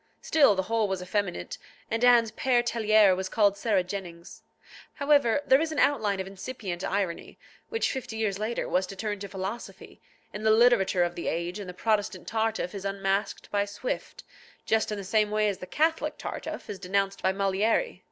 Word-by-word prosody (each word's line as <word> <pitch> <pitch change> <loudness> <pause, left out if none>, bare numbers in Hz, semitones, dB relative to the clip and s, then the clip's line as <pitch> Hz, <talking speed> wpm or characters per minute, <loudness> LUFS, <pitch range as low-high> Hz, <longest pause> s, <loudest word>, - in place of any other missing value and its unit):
Still 280 -10 +4
the 190 - 0
whole 220 +2 0
was 190 -2 -3
effeminate, 185 - -3 0.3
and 225 +2 -1
Anne's 240 -2 +5
Père 240 +1 +1
Tellier 215 -4 +4
was 185 0 -4
called 205 -2 +3
Sarah 200 -2 +1
Jennings. 180 -2 -8 0.5
However, 285 -3 +3
there 265 +1 +5
is 320 -1 -1
an 310 - -5
outline 210 -11 +2
of 190 - -2
incipient 190 -2 -6
irony, 190 -4 -2 0.3
which 455 - 0
fifty 255 -4 -5
years 205 -3 -1
later 220 +3 -2
was 185 +1 +1
to 195 - -8
turn 205 0 -3
to 200 - -6
philosophy, 195 +4 -7 0.3
in 210 - -6
the 220 - +2
literature 220 -5 +4
of 175 0 -1
the 170 - -5
age, 170 +4 -2
and 195 -3 -7
the - - -6
Protestant 215 -1 -1
Tartuffe 220 -4 -1
is 200 -2 -6
unmasked 195 0 -2
by 205 -1 +2
Swift 205 +4 -5 0.4
just 220 -1 +1
in 210 - -2
the 200 - -5
same 210 +2 +2
way 215 0 +1
as 200 -2 -2
the 180 - -8
Catholic 320 - 0
Tartuffe - - -6
is 200 - -6
denounced 195 +1 -1
by 190 - +2
Molière. 200 - 0
205 Hz, 190 wpm, -27 LUFS, 190-225 Hz, 0.5 s, Anne's